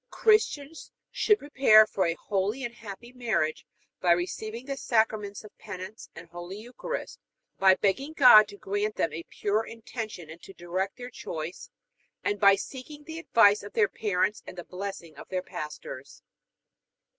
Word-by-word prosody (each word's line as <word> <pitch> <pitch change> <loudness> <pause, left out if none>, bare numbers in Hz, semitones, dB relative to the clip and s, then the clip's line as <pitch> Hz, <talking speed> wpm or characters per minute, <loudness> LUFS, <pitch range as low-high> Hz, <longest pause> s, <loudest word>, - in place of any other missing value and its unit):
Christians 325 -9 +1 0.2
should 420 - +3
prepare 265 - +6
for 195 -4 0
a 165 - 0
holy 205 +8 -2
and 240 -1 -4
happy 235 +2 -10
marriage 215 -11 -1 0.3
by 175 -1 +4
receiving 215 +7 -4
the 275 0 -3
Sacraments 220 -5 0
of 210 - -14
Penance 200 +1 -8
and - - -10
Holy 175 +3 -8
Eucharist; 245 - -6 0.4
by 190 -1 +6
begging 270 +12 0
God 230 -8 +8
to 200 0 -11
grant 205 +2 -2
them 160 - 0
a 165 - -4
pure 210 +2 0
intention 220 -6 -7
and 165 +1 -12
to 195 - -12
direct 185 +3 -3
their 245 0 -8
choice; 160 -4 -6 0.5
and 205 0 -1
by 200 -1 +7
seeking 280 +7 -8
the 320 +1 -7
advice 210 -10 +5
of 205 - -10
their 210 -2 +4
parents 205 0 0
and 180 - -9
the 175 - -6
blessing 180 -4 -7
of - - -11
their 185 -1 -2
pastors. 150 -4 -8
205 Hz, 160 wpm, -28 LUFS, 185-240 Hz, 0.5 s, God